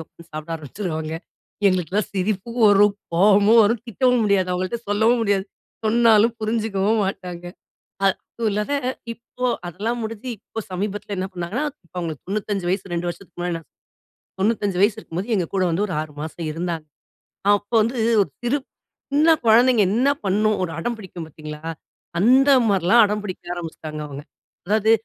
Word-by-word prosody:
உட்கார்ந்து 170 +1 -18
சாப்பிட 155 +1 -6
ஆரம்பிச்சுருவாங்க. 160 0 -5 0.6
எங்களுக்கெல்லாம் 185 +2 0
சிரிப்பு 195 +3 -1 0.2
வரும். 205 0 +5 0.2
கோவமும் 205 +5 +6
வரும். 220 +2 +2
திட்டவும் 250 +1 +2
முடியாது, 200 -3 +2
அவங்கள்ட்ட 185 +5 -2
சொல்லவும் 220 +4 +3
முடியாது. 200 -3 +1 0.4
சொன்னாலும் 225 0 +4
புரிஞ்சுக்கவும் 215 -1 0
மாட்டாங்க. 180 -2 -5 0.6
அ - - +2 0.3
அதுவும் 230 -2 0
இல்லாத, 210 +6 -1 0.4
இப்போ 245 +2 -5 0.2
அதெல்லாம் 210 +8 -3
முடிஞ்சு 225 +2 -5
இப்போ 225 +2 -7
சமீபத்துல 205 +2 -4
என்ன 185 - -1
பண்ணாங்கன்னா, 185 - -3 0.2
இப்ப - - -38
அவுங்களுக்கு 160 -5 -4
95 200 -1 -2
வயசு 190 -1 -2
2 170 +1 -2
வருஷத்துக்கு 175 +1 -9
முன்னாடி 175 -1 -1
நா - - -13 0.8
95 205 -2 +1
வயசு 210 +1 +4
இருக்கும்போது, 185 -1 -5
எங்க 180 -3 0
கூட 190 - +2
வந்து 175 +5 +1
ஒரு 185 - -5
6 155 -1 -6
மாசம் 160 +2 -6
இருந்தாங்க. 165 0 -3 0.7
அப்போ 205 +3 -3
வந்து 235 +4 -1 0.3
ஒரு 190 - -3
சிறு 245 +4 +1 0.5
சின்ன 310 +3 +5
குழந்தைங்க 235 +1 +6
என்ன 245 +6 +2 0.2
பண்ணும், 210 +2 +2
ஒரு 165 - -4
அடம் 235 +8 -2
பிடிக்கும் 180 -5 -8
பார்த்தீங்களா, 150 0 -9 0.6
அந்தமாரிலாம் 235 -4 +5
அடம் 210 0 -2
பிடிக்க 185 -3 -6
ஆரம்பிச்சிட்டாங்க, 160 -3 -6
அவுங்க. 140 0 -7 0.4
"அதாவது, 215 +2 +2
200 Hz, 150 wpm, -22 LUFS, 175-225 Hz, 0.8 s, கோவமும்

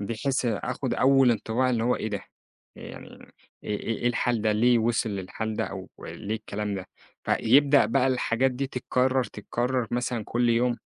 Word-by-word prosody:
بحيث 115 +6 -2
آخد 110 -4 -2
أول 135 -1 +5
انطباع 115 +3 0
اللي 115 -2 0
هو 125 - +2
إيه 110 - -3
ده، 100 -2 -3 0.6
ي - - -12
يعني - - -10 0.6
إيه 105 -1 -3
إيه 115 - -3
إيه 120 - -2
الحال 120 -2 0
ده؟ 110 - +2
ليه 120 +3 +4
وصل 115 -1 0
للحال 105 +3 -4
ده؟ 110 - 0
أو 95 -1 -7
ليه 105 +2 -5
الكلام 105 -1 -4
ده؟ 95 -1 -6 0.4
فيبدأ 140 +4 +4
بقى 135 -1 +2
الحاجات 130 0 +1
دي 135 +2 -3
تتكرر 130 0 0
تتكرر 120 +4 -2
مثلًا 120 -2 -2
كل 120 0 0
يوم. 120 +1 +2
120 Hz, 175 wpm, -26 LUFS, 110-125 Hz, 0.6 s, أول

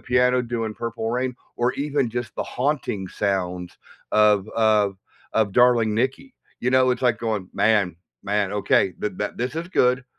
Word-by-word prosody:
piano, 125 0 +2
doing 115 -2 -3
Purple 115 -1 -4
Rain, 125 +1 -1 0.2
or 120 +1 +1
even 140 -2 0
just 120 +1 -4
the - - -1
haunting 125 -8 -2
sounds 90 -3 -2 0.4
of 105 -1 +4
of 105 -3 +2 0.4
of 110 -3 +2
Darling 120 -2 +4
Nikki, 130 - -2 0.3
you 125 - 0
know? 130 0 +4
It's 125 0 -2
like 120 -3 +2
going, 110 -5 -2
"Man 105 -6 +2 0.3
man, 100 -1 0
okay. 100 -2 +2
Th 105 - -2
that 105 +1 -3
this 125 +6 -3
is 165 - -3
good. 125 -6 +2
115 Hz, 165 wpm, -23 LUFS, 105-125 Hz, 0.4 s, of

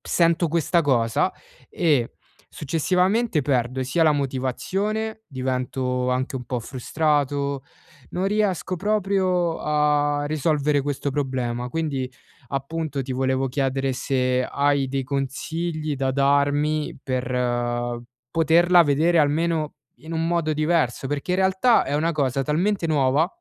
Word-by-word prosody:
Sento 170 0 +2
questa 170 +2 +1
cosa, 120 -5 +1 0.4
e 145 -9 +1 0.4
successivamente 180 - +1
perdo, 130 -1 0
sia 135 +6 +1
la 155 - +5
motivazione, 190 - -2
divento 130 -1 -2
anche 130 +1 -1
un 125 - -6
po' 120 0 -3
frustrato, 140 +1 -1 0.5
non 185 +2 -1
riesco 200 -3 0
proprio 190 -3 +1
a 150 -1 +1
risolvere 150 -1 +1
questo 145 0 -2
problema. 125 -3 -2
Quindi, 140 -6 -2 0.4
appunto, 140 +1 -3
ti 130 - -5
volevo 130 +1 0
chiedere 135 0 -1
se 130 -1 0
hai 140 -1 +1
dei 135 0 -1
consigli 155 +3 -3
da 135 0 0
darmi, 145 +2 +1
per 120 -2 -1 0.3
poterla 170 +2 +5
vedere 160 +4 +3
almeno 155 +1 +1 0.2
in 160 +2 -10
un 165 0 0
modo 170 -2 0
diverso, 155 -5 0
perché 145 +4 -3
in 180 - +1
realtà 190 +5 +3
è - - -3
una 165 +3 +1
cosa 135 -3 0
talmente 170 +6 0
nuova, 145 0 +2
145 Hz, 125 wpm, -23 LUFS, 130-165 Hz, 0.5 s, la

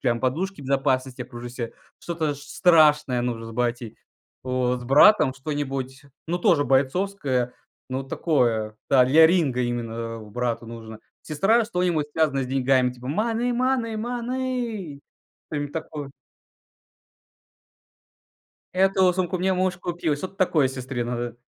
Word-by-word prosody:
прям 120 -3 0
подушки 160 +7 -2
безопасности 135 -1 0
окружи 120 0 -8
ся, 120 -2 -5 0.3
что-то 160 -4 -2
ш 140 - -12
страшное 150 -6 +3
нужно 115 -2 -3
с - - -8
батей, 120 -1 -2 0.5
вот. 125 -1 -1
С - - -9
братом 145 - +6
что-нибудь, 135 -2 -4 0.3
ну 175 +1 0
тоже 165 -4 +3
бойцовское, 135 -2 0 0.4
ну 130 +1 -3
такое, 120 -8 0
да, 130 -2 +6
для 155 +6 +7
ринга 160 -8 +1
именно, 115 -1 -3
а - - -10
брату 115 +2 -3
нужно. 110 -1 -9 0.2
Сестра- 195 +10 +2
что-нибудь 180 -7 0
связанное 145 -4 +1
с - - -6
деньгами, 130 -1 +2
типа: 125 0 -11
"Money, 225 - 0
money, 245 -2 0
money" 240 - -3 0.5
что-нибудь 145 -1 -3
такое. 150 -3 -6 2.6
"Эту 190 0 +3
сумку 185 0 -1
мне 190 +1 +1
муж 185 -1 0
купил". 175 -4 -2
Что-то 190 +6 -7
такое 165 -7 +2
сестре 130 -1 -4
надо. 120 -1 -4
140 Hz, 130 wpm, -24 LUFS, 125-180 Hz, 2.6 s, для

